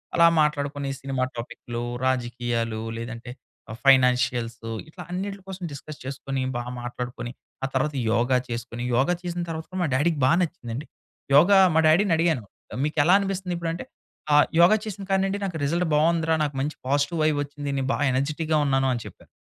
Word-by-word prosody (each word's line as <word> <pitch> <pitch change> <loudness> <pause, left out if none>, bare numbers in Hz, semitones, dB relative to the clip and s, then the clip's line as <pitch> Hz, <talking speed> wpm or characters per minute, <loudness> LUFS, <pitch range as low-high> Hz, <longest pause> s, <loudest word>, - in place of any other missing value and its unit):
అలా 170 -1 +7
మాట్లాడుకొని 145 -2 -1
సినిమా 135 -1 -1
టాపిక్లు, 120 0 -6 0.2
రాజకీయాలు, 120 -3 -1 0.2
లేదంటే 120 +1 -6 0.4
ఆహ్, 110 - -7
ఫైనాన్షియల్సు, 125 -3 +3 0.2
ఇట్లా 170 +3 -11
అన్నిట్లి 195 +2 -4
కోసం 190 -1 -7
డిస్కస్ 145 +2 -9
చేసుకొని, 135 0 -4
బా 120 - -2 0.2
మాట్లాడుకొని, 120 0 -5 0.3
ఆ - - 0
తర్వాత 150 +3 0 0.2
యోగా 125 +2 +3
చేసుకొని, 120 0 -5
యోగ 130 +3 +3 0.2
చేసిన 175 0 -3
తర్వాత 160 0 -4
కూడా 185 - -4
మా - - +1
డాడీకి 150 +3 +1
బా 130 - +4
నచ్చిందండి. 150 -6 -4 0.5
యోగా 175 +7 +7 0.2
మా - - +5
డాడీనడిగాను, 165 - +3 0.4
మీకెలా 150 +3 +3
అనిపిస్తందిప్పుడంటే, 180 -4 -3 0.5
ఆహ్, 150 - +7
యోగా 175 +5 +7
చేసిన 205 -2 -6
కాడ 195 0 +3
నిండి 195 +1 -2
నాకు 180 -4 -3
రిజల్ట్ 170 +4 0
బావుందిరా, 160 +1 +3
నాకు 145 -2 -2
మంచి 150 +3 -2
పాజిటివైబొచ్చింది. 145 0 0
నే 135 - 0
బాగా - - 0
ఎనర్జిటిక్‌గా 155 +4 0
ఉన్నాను 135 -1 +2
అని 120 -2 -4
చెప్పారు. - - -12
145 Hz, 150 wpm, -25 LUFS, 125-170 Hz, 0.5 s, అలా